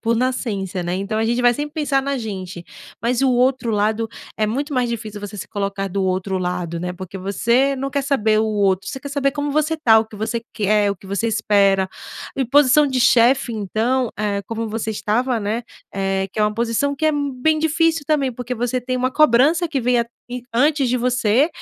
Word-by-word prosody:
por 230 0 +1
nascença, 215 -7 -2
né, 175 +1 -2
então 200 +3 -3
a 220 - +1
gente 240 +2 +1
vai 245 0 +4
sempre 295 +2 -4
pensar 290 -3 0
na 275 -1 -2
gente, 190 -5 -6 0.4
mas 245 +3 0
o 265 - +4
outro 250 -1 +2
lado 215 +2 0 0.3
é 215 - +1
muito 280 +7 -2
mais 250 -1 +1
difícil, 215 -3 -5
você 205 0 -7
se - - -6
colocar 200 -1 -3
do 195 +1 -2
outro 190 +1 -1
lado, 180 -2 -3
né, 180 +1 -3
porque 185 +1 -8
você 235 +8 +1
não 275 +1 -3
quer 280 +1 -1
saber 220 -6 +2
o 220 - +1
outro, 195 -3 +1
você 265 - -5
quer 285 - -8
saber 280 -1 0
como 290 0 -3
você 305 +2 +1
tá, 225 -8 +5
o - - -3
que 220 -1 -13
você 225 +2 -2
quer, 210 -1 +2
o 200 - -3
que 190 - -16
você 200 +4 -1
espera. 200 -3 +2 0.5
E 265 - +1
posição 285 +3 +4
de 260 -1 -1
chefe 240 +1 +4
então, 225 +4 -1
eh, 205 -1 -1
como 225 0 -3
você 220 +1 -3
estava, 230 +4 0
né, 220 +3 -2 0.3
eh, 195 0 -1
que 215 - -3
é - - +4
uma 210 0 +2
posição 235 +6 0
que 315 - 0
é - - +5
m 285 -1 -1
bem 310 +3 +3
difícil 325 0 +2
também, 280 -4 +1
porque 250 +1 -6
você 245 +1 -1
tem 255 +1 -2
uma 255 +1 0
cobrança 305 +5 +4
que 280 -4 -1
venha 240 -1 +2 0.3
i 250 0 -5
antes 280 +2 +2
de 250 - +2
você 250 +3 +2
235 Hz, 220 wpm, -20 LUFS, 205-270 Hz, 0.5 s, tá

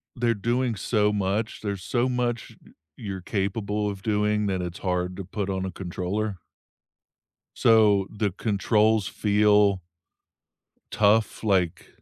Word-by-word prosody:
They're 120 -1 +1
doing 120 +3 -1
so 105 +1 +1
much. 105 +2 -2
There's 100 -3 -4
so 120 +3 0
much 120 -2 -2
y - - -19 0.3
you're 95 -4 -6
capable 105 +2 -2
of 100 -1 -7
doing 105 0 0
that 95 -2 -1
it's 90 -1 -6
hard 90 -1 -2
to 100 - -5
put 100 +2 -4
on 95 0 -2
a 95 - -4
controller 95 +3 -3 1.2
so 105 -4 +4
the 105 -1 -2
controls 105 +1 +1
feel 105 -2 +3 1.1
tough, 110 +2 +2
like 95 -6 0
105 Hz, 130 wpm, -25 LUFS, 95-110 Hz, 1.2 s, so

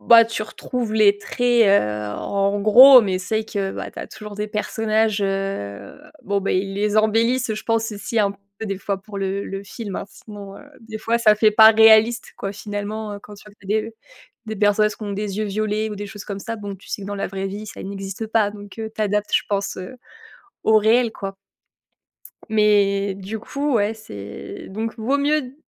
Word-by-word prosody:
Bah, 230 -1 +7
tu 230 -1 -4
retrouves 230 +1 -4
les 205 -2 +5
traits, 240 +2 +2
heu, 105 - +2
en 200 0 0
gros, 255 +5 +9
mais 185 -2 -1
c'est 190 +4 -2
vrai 220 - -1
que, 195 -3 -3
bah, - - -6
tu - - -12
as - - -6
toujours 210 -1 -10
des 210 +1 -4
personnages, 215 0 0
heu, 195 - -4 0.2
bon, 200 0 -1
bah, 195 - -2
ils 195 +1 -1
les 210 +1 0
embellissent, 230 +3 +2
heu, 220 - 0
je 215 - -6
pense, 225 -1 0
aussi 215 +2 -3
un 200 -1 +2
peu 200 +2 -11
des 195 -1 -3
fois 200 -1 -3
pour 200 +1 -10
le 195 +1 -2
le 195 0 -6
film, 200 0 -7
hein, - - -4
sinon, 200 -2 -11
heu, - - -12 0.2
des 220 -1 -8
fois, 230 +2 0
ça 215 -2 +5
fait 215 0 +4
pas 220 +1 +8
réaliste, 220 +1 +5
quoi, 195 0 -4
finalement, 210 +1 -5
heu, 200 - -7
quand 210 - -12
tu 200 - -16
vois 210 - -15
qu'il 195 0 -9
y 215 - +3
a - - +2
des, - - -7
heu, - - -13 0.5
des 220 -1 -5
personnes 205 +1 +3
qui 215 - -10
ont 205 -1 -4
des 205 0 -4
yeux 215 - 0
violets 215 +1 -1
ou - - -4
des 205 +1 -6
choses 200 0 -9
comme 200 -1 -6
ça. 230 +2 -5
Bon, 205 -2 -6
tu 190 - -18
sais 200 - -4
que - - -7
dans 205 - -4
la 200 - -2
vraie 195 0 -4
vie, 205 +2 -6
ça - - -9
n'existe 195 +2 -6
pas, 215 -2 +1
donc 205 0 -12
heu, 220 -1 -4
tu - - -7
adaptes, 210 0 -1
je - - +4
pense, 200 -1 -2
heu, 220 +8 -8 0.7
au 220 0 +5
réel, 225 +2 +3
quoi. 195 -2 -6 1.1
Mais 200 -2 +2
du 200 +3 -6
coup, 280 +4 -2
ouais, 210 -1 +2
c'est 100 - -9
donc 225 +4 -4
vaut 265 +6 0
mieux, 285 -2 0
210 Hz, 225 wpm, -21 LUFS, 200-220 Hz, 1.1 s, gros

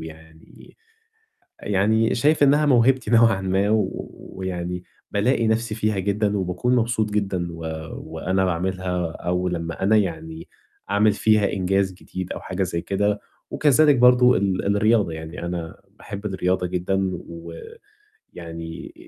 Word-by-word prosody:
ويعني 80 0 -14 0.8
يعني 110 +3 +1
شايف 145 +4 +3
إنّها 145 +2 +4
موهبتي 130 -2 +3
نوعًا 115 -4 +5
ما 95 +2 +1
و 105 -3 -1 0.3
ويعني 90 -1 -4 0.3
بالاقي 115 +3 +1
نَفْسي 110 0 0
فيها 110 -2 0
جدًا 100 +1 0
وباكون 95 +7 0
مبسوط 115 -2 +1
جدًا 95 -4 -1
و 85 - -9 0.4
وأنا 95 +4 -2
باعملها 90 -1 -2
أو 90 +2 -2
لمّا 85 0 -4
أنا 110 +3 +4
يعني 80 -4 -3 0.4
أعمل 105 +1 +4
فيها 105 -1 +2
إنجاز 95 0 0
جديد 95 0 -7
أو - - -6
حاجة 95 +1 -3
زي 85 -2 -2
كده 100 +1 0 0.3
وكذلك 145 0 +4
برضه 125 0 +6
ال 100 +1 0
الرياضة، 105 -3 +2
يعني 80 +2 -7
أنا 85 -2 -5
باحب 100 +1 -9
الرياضة 90 -2 0
جدًا 90 +2 -1 0.2
و 85 0 -9 0.8
ويعني 80 -1 -8
95 Hz, 130 wpm, -23 LUFS, 90-110 Hz, 0.8 s, برضه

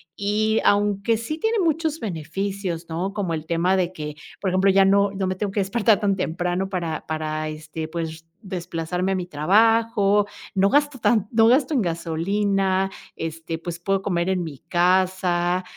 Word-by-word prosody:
y 215 +2 +1
aunque 205 +2 +2
sí 270 +8 -5
tiene 445 +4 +1
muchos 320 -2 0
beneficios, 180 -1 -4
¿no?, 175 +4 -3
como 195 -5 -2
el 160 0 -4
tema 170 +3 +2
de 180 -2 0
que, 150 -4 -6 0.2
por 195 - -1
ejemplo, 185 +2 +3
ya 195 0 +5
no 200 +1 +4
no 195 -1 -2
me 185 - -1
tengo 200 +1 -3
que 205 - -1
despertar 205 +2 +2
tan 200 -2 +1
temprano 180 +1 -2
para 170 -5 -3
para, 155 0 -3
este, 155 +1 -6
pues 165 0 -3
r 160 0 -10 0.3
desplazarme 180 0 -2
a - - 0
mi 180 -1 -2
trabajo, 205 +5 +3 0.3
no 195 0 +3
gasto 290 0 +2
tan 215 -3 +2
no 225 -1 +5
gasto 265 +5 +3
en 265 - +2
gasolina, 190 +3 0 0.2
este, 165 0 -5
pues 170 +1 -6
puedo 195 +2 0
comer 175 -3 -1
en 185 -2 0
mi 150 -5 -7
casa, 180 +1 +1
190 Hz, 175 wpm, -23 LUFS, 170-205 Hz, 0.3 s, ya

